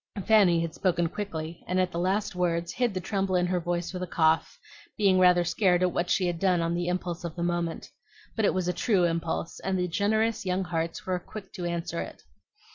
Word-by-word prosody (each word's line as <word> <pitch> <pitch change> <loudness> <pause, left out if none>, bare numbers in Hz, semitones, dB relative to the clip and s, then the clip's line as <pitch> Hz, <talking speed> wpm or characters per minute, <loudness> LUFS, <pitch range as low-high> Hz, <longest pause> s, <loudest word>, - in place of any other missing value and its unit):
Fanny 200 -6 +5
had 165 -1 -3
spoken 175 -2 +1
quickly, 165 -5 -5
and 185 +1 0
at 185 -1 +1
the 170 - -3
last 190 +4 0
words 170 -1 -1
hid 245 -2 +1
the - - 0
tremble 195 0 -1
in 180 0 +3
her 180 0 0
voice 175 +1 -2
with 180 - -4
a 180 - -3
cough, 160 - +2 0.4
being 195 -3 +4
rather 180 -1 +5
scared 180 +1 +2
at 180 - +2
what 175 +1 -1
she 190 - +2
had 175 -2 -1
done 185 -2 +2
on 165 0 0
the 175 0 -1
impulse 180 -1 -2
of 170 -2 -5
the 170 - -3
moment. 175 -1 -2 0.5
But 220 - +1
it - - +3
was 185 -1 -1
a 180 - +1
true 190 0 +2
impulse, 165 -1 -1
and 190 0 -1
the 180 0 0
generous 215 +5 +1
young 185 0 0
hearts 165 -2 -3
were 185 -1 -1
quick 195 +2 -10
to 180 -3 -5
answer 170 -1 -2
it. - - -9
180 Hz, 225 wpm, -27 LUFS, 170-190 Hz, 0.5 s, Fanny